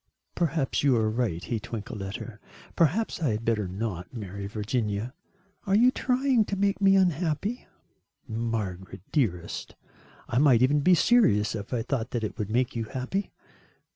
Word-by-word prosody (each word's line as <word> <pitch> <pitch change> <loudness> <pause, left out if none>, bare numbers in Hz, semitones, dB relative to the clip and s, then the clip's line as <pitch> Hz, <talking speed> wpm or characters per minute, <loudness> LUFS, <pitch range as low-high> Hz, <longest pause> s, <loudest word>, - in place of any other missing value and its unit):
"Perhaps 160 -5 0
you 140 -3 +4
are 110 -1 +1
right," 110 -7 -1
he 115 - -2
twinkled 110 0 -6
at 95 +2 -5
her, 110 -3 -8 0.4
"perhaps 175 +5 +1
I 150 - +2
had 110 +1 -2
better 105 -4 +1
not 95 -1 -4
marry 100 -4 -6
Virginia." 105 +2 -2 0.5
"Are 195 - +3
you 245 +4 +6
trying 255 -2 +2
to 200 - -3
make 200 +1 0
me 195 0 +6
unhappy?" 180 - 0 0.6
"Margaret, 105 -5 -4
dearest, 90 - -1 0.5
I 120 - +1
might 130 -5 +5
even 145 +3 +4
be 180 +5 +5
serious 165 - +4
if 105 -2 -6
I 120 -3 -1
thought 120 -1 -2
that 120 -2 -3
it 105 - -4
would 105 -1 -2
make 125 +3 0
you 115 -1 -2
happy." 130 - -3
120 Hz, 165 wpm, -27 LUFS, 105-165 Hz, 0.6 s, you